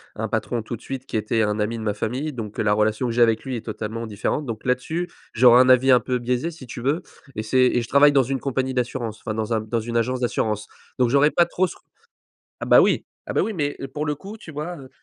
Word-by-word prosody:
un - - -3
patron 120 - -1
tout 115 +2 -6
de - - -24
suite, 135 -1 -6
qui - - -3
était 110 +1 0
un 105 0 0
ami 110 +2 -1
de 110 - -6
ma 105 -1 0
famille, 125 +9 -3
donc 110 -5 -7
heu, - - +2
la 105 - +2
relation 110 +4 +1
que - - -1
j'ai 120 - +1
avec 115 -2 +3
lui 130 -2 -3
est 115 - -9
totalement 110 +1 -5
différente, 110 +7 -2
donc 115 -3 -6
là 125 - +4
dessus, 165 +8 -4 0.2
j'aurai 120 +1 +7
un 130 - +6
avis 130 +1 +5
un 125 - +7
peu 125 +2 -2
biaisé 125 +6 -1
si 160 -5 -11
tu 120 0 -8
veux, 140 +7 0 0.3
et 110 - -3
c'est 130 +4 +1
et 125 -1 +2
je 115 - -6
travaille 145 +1 +6
dans 135 -2 +5
une 135 +2 -2
compagnie 130 -1 -2
d'assurance, 120 -3 -3
enfin 110 - -4
dans 110 +1 -3
un 110 - +2
dans 110 +2 -2
une 120 +1 -3
agence 125 +2 0
d'assurance, 110 -3 -1 0.3
donc 125 -2 +3
j'aurais 140 +3 +4
pas 175 - +4
trop 185 +2 0
ce - - -10
r - - -21 0.8
ah - - -2
bah - - +7
oui - - +2 0.2
ah - - -5
bah - - +2
oui, 225 - -1
mais 145 -5 -2 0.2
pour 150 +1 -2
le 150 0 -1
coup, 200 +8 -10
tu 170 - -11
vois, 155 +4 -5
heu 130 -2 -12
125 Hz, 280 wpm, -23 LUFS, 110-140 Hz, 0.8 s, j'aurai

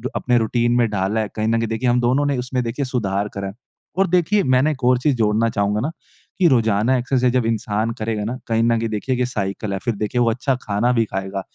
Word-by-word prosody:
अपने 125 -1 +1
रूटीन 120 +1 +1
में 120 -2 +2
डाला 100 +1 -1
है 110 - -2
कहीं 110 0 -1
न 115 +1 +2
कहीं 115 - -1
देखिए 115 +3 -1
हम 120 +1 +3
दोनों 130 +4 +2
ने 140 -2 0
उसमें 125 0 -2
देखिए 120 +4 -3
सुधार 105 -6 -1
करा 100 0 -4
है। 95 - -7 0.4
और 195 0 +3
देखिए 180 +3 +2
मैंने 130 +3 +3
एक 135 -3 -7
और 125 0 +4
चीज़ 140 +2 +1
जोड़ना 110 0 +2
चाहूँगा 100 -1 0
ना 150 - -2 0.5
कि 180 - +5
रोजाना 115 -1 +2
एक्सरसाइज़ 125 0 +1
जब 125 -3 +1
इंसान 110 0 -1
करेगा 110 -1 -2
ना, 125 +4 -3
कहीं 115 -1 +1
न 115 0 +3
कहीं 115 0 -2
देखिए 110 +5 -2
कि 125 0 0
साइकल 100 -3 -3
है। 95 - -2
फ़िर 115 +2 -2
देखिए 105 +4 -1
वो 120 - +3
अच्छा 130 +4 0
खाना 105 +4 0
भी 115 -2 +3
खाएगा। 95 -1 -4
115 Hz, 245 wpm, -21 LUFS, 105-125 Hz, 0.5 s, कि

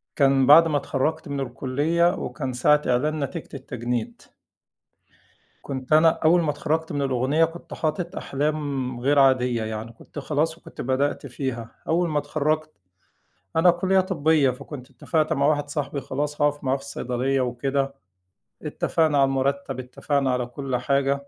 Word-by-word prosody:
كان 135 -2 +4
بَعد 165 +3 +8
ما 150 -2 +1
اتخرّجت 140 +3 -2
من 140 -1 -3
الكلّية، 145 +7 +1
وكان 135 -5 -4
ساعة 150 +4 +3
إعلان 150 +6 +1
نتيجة 165 +3 -5
التجنيد. 125 -4 -4 1.4
كنت 130 0 -3
أنا 160 +2 +7
أول 165 +2 +3
ما 155 -3 +1
اتخرّجت 160 +1 -2
من 145 - -2
الأغنية 135 +4 +2
كنت 165 +1 -10
حاطط 170 +4 -2
أحلام 140 -3 -2
غير 140 +3 +3
عادية 125 -4 +3
يعني، 110 +1 -5
كنت 130 - -10
خلاص، 155 +3 -1
وكنت - - -10
بدأْت 135 +3 -1
فيها. 125 -3 -5 0.2
أول 170 +1 +1
ما 150 -1 +1
اتخرّجت، 155 +1 -1 0.9
أنا 170 +2 +6
كلّية 190 +2 +2
طبّية، 160 -6 +2
فكنت 130 0 -9
إتفقت 155 +5 0
مع 140 0 +1
واحد 145 -1 0
صاحبي 145 -1 -3
خلاص 150 +3 -3
هاقف 145 0 +1
معاه 130 0 +1
في - - -13
الصيدلية 135 -1 -1
وكده. 135 +3 -1 0.7
إتفقنا 160 -3 +1
على 135 - +5
المرتّب، 135 0 -1
إتفقنا 130 +2 -1
على 125 -1 -1
كل 130 +1 -4
حاجة، 140 +2 0
140 Hz, 150 wpm, -24 LUFS, 130-155 Hz, 1.4 s, بَعد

